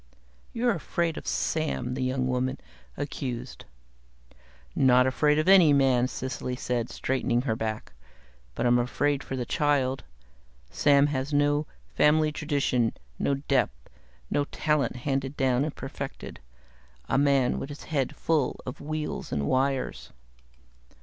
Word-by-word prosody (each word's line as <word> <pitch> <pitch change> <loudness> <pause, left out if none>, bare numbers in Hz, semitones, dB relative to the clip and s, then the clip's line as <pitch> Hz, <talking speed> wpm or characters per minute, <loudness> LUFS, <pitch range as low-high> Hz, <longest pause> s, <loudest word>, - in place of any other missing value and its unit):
"You're 240 +1 +1
afraid 170 -1 -1
of - - -8
Sam," 150 -6 -1
the - - -3
young 130 0 0
woman 130 +1 -1 0.4
accused. 135 -4 -5 1.1
"Not 125 -1 +5
afraid 150 +3 +2
of 155 - +1
any 185 -6 +7
man!" 130 -3 +3
Cecily 130 -1 -4
said, 125 -2 -2
straightening 125 -2 -1
her 115 -5 0
back. 110 -1 -4 0.6
"But - - -1
I'm 120 0 +4
afraid 140 +3 0
for 135 - -5
the 125 -2 -3
child. 135 -1 +1 0.7
Sam 140 -1 +4
has 135 +2 -2
no 145 +1 +2 0.3
family 155 +1 +4
tradition, 140 -6 0 0.3
no 140 - +1
depth, 135 - -1 0.4
no 145 - +1
talent 150 -5 0
handed 135 +2 -2
down 130 -1 +2
and 150 0 -4
perfected. 135 0 -7 0.7
A - - +2
man 140 -3 +2
with 140 - -5
his 145 - -9
head 140 -5 -2
full 155 -6 0
of 130 - -7
wheels 155 +1 -4
and 70 -1 -1
wires." 135 - -1
135 Hz, 135 wpm, -27 LUFS, 125-145 Hz, 1.1 s, any